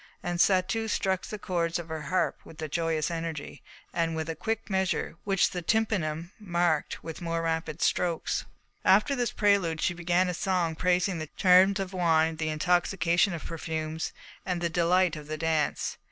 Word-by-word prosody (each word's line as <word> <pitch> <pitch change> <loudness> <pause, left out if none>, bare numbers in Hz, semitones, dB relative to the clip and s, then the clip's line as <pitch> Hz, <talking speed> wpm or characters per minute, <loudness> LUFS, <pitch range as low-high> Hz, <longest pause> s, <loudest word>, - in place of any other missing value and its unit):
And 175 0 -2
Satou 195 +5 +2
struck 190 -2 0
the 215 - -5
cords 170 -4 -1
of 170 -1 -6
her 160 -1 -4
harp 185 +5 0
with 160 -1 -7
joyous 165 -1 0
energy, 165 -3 -5 0.3
and 165 -1 0
with 160 0 -2
a - - -6
quick 220 +7 -3
measure 190 -4 -1
which 195 -2 +2
the 180 - -3
tympanum 175 -5 0
marked 175 -5 0
with 165 +1 -7
more 165 -1 -2
rapid 165 -1 -2
strokes. 170 -2 0 0.4
After 210 +9 +4
this 245 -3 0
prelude 200 -6 +2
she 175 - +1
began 175 +1 +1
a 180 - -1
song 175 -2 0
praising 180 +1 +1
the 155 -1 -5
charms 190 +2 +6
of 190 -1 -4
wine, 160 -3 +2
the 155 0 -1
intoxication 175 +3 +2
of 165 - -6
perfumes, 160 -1 -4 0.3
and 180 -2 -2
the 170 0 0
delight 175 +1 +2
of 150 -1 -9
the 155 0 -4
dance. 160 -2 0
170 Hz, 170 wpm, -28 LUFS, 160-185 Hz, 0.4 s, charms